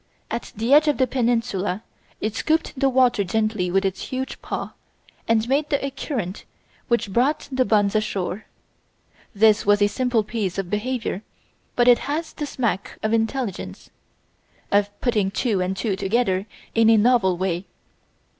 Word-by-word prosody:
At - - -4
the 225 +5 +1
edge 300 +1 +6
of 295 - +2
the 260 - +3
peninsula 230 -6 -1 0.4
it 215 0 -2
scooped 315 +6 0
the 270 0 +2
water 250 -5 +3
gently 215 -1 0
with 195 +2 +1
its 190 0 -2
huge 260 -1 -5
paw - - -5 0.5
and 225 0 +2
made 285 +3 0
a 275 -1 0
current 235 - -4 0.4
which 235 -5 0
brought 265 +7 +1
the 260 -1 +2
buns 205 -3 +2
ashore. 205 -2 -2 0.9
This 215 +1 +5
was 205 0 +4
a 205 - +5
simple 245 0 0
piece 205 -4 -3
of 190 -2 -3
behaviour, 225 -2 -2 0.5
but 240 0 +3
it 245 -1 +7
has 315 +3 -2
the 295 - -4
smack 235 -8 -2
of 215 +1 0
intelligence 225 -2 -2 0.8
of 205 0 +3
putting 215 -6 +1
two 200 -1 0
and 185 +1 -2
two 195 0 -1
together 195 -1 0 0.3
in 225 -1 +4
a 225 - +6
novel 210 -5 +3
way. 185 0 -2
220 Hz, 155 wpm, -23 LUFS, 195-255 Hz, 0.9 s, it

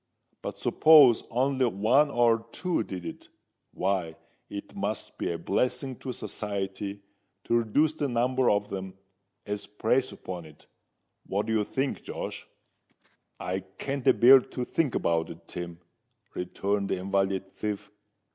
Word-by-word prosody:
But - - -5
suppose 150 -7 +6
only 130 +1 +2
one 120 +8 +3
or 115 -3 +2
two 180 -7 -1
did 95 -5 -6
it—why, 90 -3 -4 0.3
it 100 0 -7
must 100 +1 -3
be - - -1
a 85 - -2
blessin' 125 - -1
to 130 - -5
society 100 -3 -4 0.4
to 120 - +2
reduce 145 +8 +2
the 150 -2 -1
number 125 +1 +2
of 105 +1 +1
them 95 -1 -5 0.5
as 105 0 -4
preys 110 +5 +1
upon 90 -3 -7
it. 75 -1 -16 0.6
What 100 +2 -1
do 110 - -1
you 110 -1 +2
think, 135 +6 -2
Josh?" - - -6 0.9
"I 90 +2 -2
can't 125 +9 -5
a - - +8
bear 130 +3 +9
to 125 0 -5
think 155 -3 0
about 85 -1 +1
it, 85 0 -11
Tim," 85 -1 -6 0.5
returned 100 +2 -2
the - - 0
invalid 95 0 -1
thief. 105 0 -4
105 Hz, 140 wpm, -28 LUFS, 95-125 Hz, 0.9 s, bear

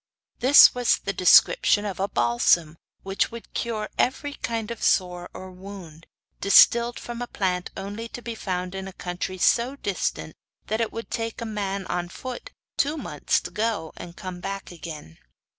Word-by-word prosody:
This 265 +4 +8
was 245 -1 +2
the 200 - -4
description 205 - +5
of 195 -3 -4
a 195 - +1
balsam 155 +5 +2 0.3
which 195 0 0
would 235 0 -11
cure 220 -2 -2
every 285 +3 0
kind 230 -3 -4
of 235 - -7
sore 180 -1 +1
or 185 0 -9
wound 180 -4 -11 0.3
distilled 235 +4 +5
from 240 0 -7
a 245 - -3
plant 180 -5 -2
only 205 +4 -5
to 245 - -9
be 235 - -4
found 185 -4 -4
in 190 0 -5
a 190 - -9
country 180 +1 -5
so 240 +8 +2
distant 190 - -3 0.3
that 220 +2 -1
it 225 - -1
would 230 0 -7
take 225 -1 -3
a 230 - -4
man 200 -3 -3
on 175 -1 -3
foot 255 +5 -7 0.3
two 295 +3 +1
months 150 - -1
to 175 - -8
go 210 -5 -2
and 175 0 -10
come 185 -2 -7
back 195 +1 -6
again. 155 - -9
195 Hz, 175 wpm, -25 LUFS, 180-230 Hz, 0.3 s, This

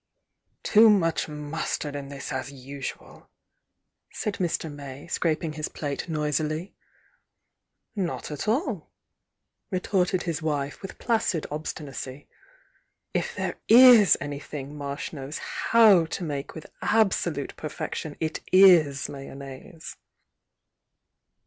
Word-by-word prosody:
"Too 220 +1 +7
much 175 -6 +2
mustard 150 0 -4
in 140 -1 -6
this, 140 -1 -6
as 130 +1 -4
usual," 135 0 -8 0.8
said 210 - -3
Mr. 170 -2 -1
May, 140 -1 -9
scraping 160 -2 -1
his 155 0 -4
plate 145 +3 -4
noisily. 155 +3 -1 1.2
"Not 185 -6 -3
at 150 - -5
all," 255 - -1 0.8
retorted 185 -1 0
his 165 -3 -3
wife, 145 -2 -2
with 195 - -8
placid 220 -8 0
ob 155 +1 -4
stinacy. 140 -2 -6 0.9
"If - - -2
there - - -3
is 240 -3 +9
anything 145 0 -6
Marsh 140 +1 -5
knows 140 0 -6
how 215 -7 +4
to 175 - -4
make 145 -3 -4
with 160 - -8 0.2
absolute 175 -9 +1
perfection, 155 0 -5
it 160 0 -2
is 175 -7 +6
mayonnaise." 140 +3 -9
155 Hz, 110 wpm, -26 LUFS, 140-180 Hz, 1.2 s, is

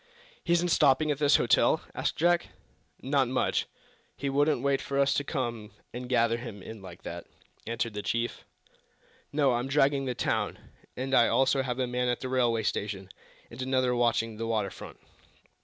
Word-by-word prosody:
"He 170 - -2
isn't 175 +1 +2
stopping 150 -1 +4
at 145 - -2
this 145 -1 +5
hotel?" - - +3
asked - - -2
Jack. 175 +1 +2 0.6
"Not 135 -1 +2
much! 130 +1 0 0.5
He 140 -1 -2
wouldn't 145 -1 +2
wait 140 -1 +1
for 140 - -3
us 140 0 +3
to 145 - 0
come 120 -7 -4 0.2
and 125 +1 -6
gather 115 -2 +2
him 105 -6 -8
in 110 -2 -9
like 90 -2 -11
that," 85 0 -7 0.4
answered 115 0 -2
the 105 - -4
chief. 115 +3 -2 0.9
"No; 145 -2 +3
I'm 120 +2 -1
dragging 140 0 +2
the 125 -1 -2
town, - - -1 0.4
and 130 +2 -3
I 120 -2 +6
also 135 +1 +3
have 125 -2 -3
a 130 - +1
man 125 0 -1
at 120 -1 0
the 130 - -4
railway 120 -3 +1
station, 100 -2 -3 0.4
and 115 +3 -8
another 130 -1 +1
watching 115 -2 +1
the 115 +1 -3
water 105 -4 0
front." - - -10
125 Hz, 180 wpm, -28 LUFS, 115-140 Hz, 0.9 s, I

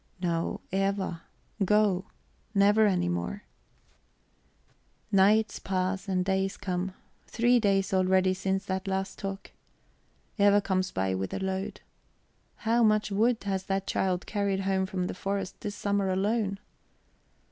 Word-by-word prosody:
"No, 170 -2 -1
Eva. 195 -3 -1 0.4
Go 200 -2 +3 0.5
never 205 +2 +5
any 185 - +1
more!" 85 - -3 1.7
Nights 210 +3 +4
pass 190 +1 -2
and 185 -2 0
days 190 0 0
come 185 -1 -3 0.3
three 240 +1 +3
days 195 -3 +1
already 185 0 +3
since 190 +1 -1
this 190 0 -3
last 190 0 -2
talk. 195 0 -6 0.9
Eva 205 0 +6
comes 185 -2 0
by 95 0 -1
with 95 0 -3
a - - -2
load. 190 0 -3 0.8
How 230 +2 +3
much 215 -1 +3
wood 225 +3 +2
has 190 -1 -2
that 195 0 -1
child 185 -2 -1
carried 200 -2 -1
home 190 -1 0
from 185 -1 -2
the - - -3
forest 195 0 -4
this 205 -2 -4
summer 200 -1 0
alone? 200 +1 0
195 Hz, 130 wpm, -28 LUFS, 185-205 Hz, 1.7 s, Eva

